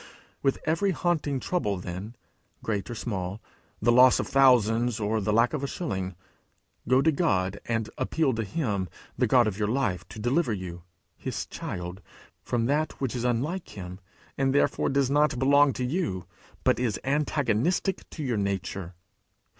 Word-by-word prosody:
With 135 -1 +2
every 165 +6 +2
haunting 160 -6 0
trouble 115 - -1
then, 90 +6 -6 0.5
great 100 -3 -2
or 120 - -4
small, 100 -4 -3 0.4
the 120 - +3
loss 125 +1 +7
of - - 0
thousands 120 -3 +4
or 110 +1 0
the 105 - 0
lack 115 +3 +3
of 145 -2 -2
a - - 0
shilling, 95 - -3 0.7
go 130 +2 +4
to 160 - +4
God, 100 - 0
and 115 -2 0
appeal 155 -5 +1
to 115 0 -1
him, 100 - -2 0.3
the - - +2
God 125 -2 +5
of 105 -1 -2
your 105 - +1
life, 105 -7 -1
to - - -11
deliver 120 +4 +1
you, 90 -3 -6 0.4
his - - -4
child, 90 +2 -6 0.4
from 120 -2 -1
that 150 +5 +1
which 130 -3 -2
is 120 - -2
unlike 130 - -2
him, 90 0 -7 0.4
therefore 135 +1 +2
does 135 -1 +1
not 145 -2 +3
belong 140 +2 +5
to 125 - -2
you, 125 - -2 0.4
but - - +3
is 120 -5 0
antagonistic 145 - 0
to 155 - -6
your 125 -5 0
nature. 95 -2 -3
120 Hz, 160 wpm, -27 LUFS, 100-140 Hz, 0.7 s, loss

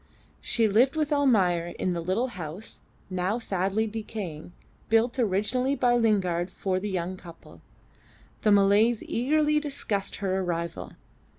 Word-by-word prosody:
She 230 -2 +2
lived 240 +8 +3
with 305 -1 0
Almayer 190 -12 +2
in 185 - -1
the 170 - -3
little 195 +9 -1
house 180 0 -8 0.3
(now 185 +4 -1
sadly 195 -1 -1
decaying) 210 -7 -6 0.4
built 230 +3 +2
originally 240 +6 +1
by 245 -3 +2
Lingard 190 -7 +1
for 185 -1 -2
the 205 +2 -4
young 185 -1 -3
couple. 170 -2 -14 0.8
The 215 - +3
Malays 205 +3 +4
eagerly 300 +5 +1
discussed 270 -9 -3
her 190 -1 -1
arrival. 170 -2 -4
205 Hz, 130 wpm, -27 LUFS, 185-240 Hz, 0.8 s, Malays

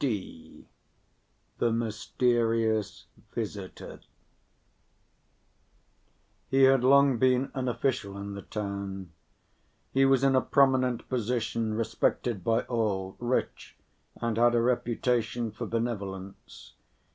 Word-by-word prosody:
(d) 95 - -5 0.9
The 120 - +2
Mysterious 115 -1 0 0.3
Visitor 100 -4 -6 2.5
He 135 0 +4
had 135 -1 +5
long 140 -1 +5
been 130 +1 +2
an 130 -1 -2
official 115 -5 -1
in 100 0 -6
the 100 - -7
town; 100 -3 -5 0.8
he 135 - +4
was 135 -1 +3
in 135 -1 +4
a 130 - +4
prominent 130 -3 +2
position, 115 -2 -1
respected 115 -2 -1
by 115 +3 +2
all, 100 -5 -2
rich 120 +1 -2 0.4
and 115 -2 -2
had 120 +1 +4
a 120 - +3
reputation 120 -1 0
for - - -6
benevolence. 100 -5 -5
115 Hz, 100 wpm, -28 LUFS, 105-125 Hz, 2.5 s, had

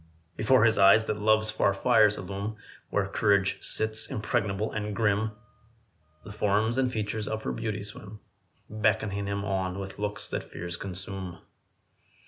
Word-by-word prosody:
Before 120 +1 +4
his 110 -2 +3
eyes 100 +3 +7
that 105 - -2
love's 110 0 +3
far 100 - +2
fires 110 -1 +4
illume 100 +3 -5 0.3
Where - - +1
courage 100 -2 +1
sits, 110 0 -1
impregnable 110 -4 -1
and 105 -1 -3
grim 110 0 +1 0.9
The 105 - -9
form 105 +2 +1
and 130 -1 +1
features 110 -1 -3
of 110 0 -3
her - - -2
beauty 105 -2 -3
swim, 105 +1 -9 0.5
Beckoning 100 -1 0
him 100 0 -2
on 95 -2 -1
with 100 0 -7
looks 105 +1 -2
that - - -4
fears 85 +1 -5
consume. 95 -1 -4
105 Hz, 145 wpm, -28 LUFS, 100-110 Hz, 0.9 s, eyes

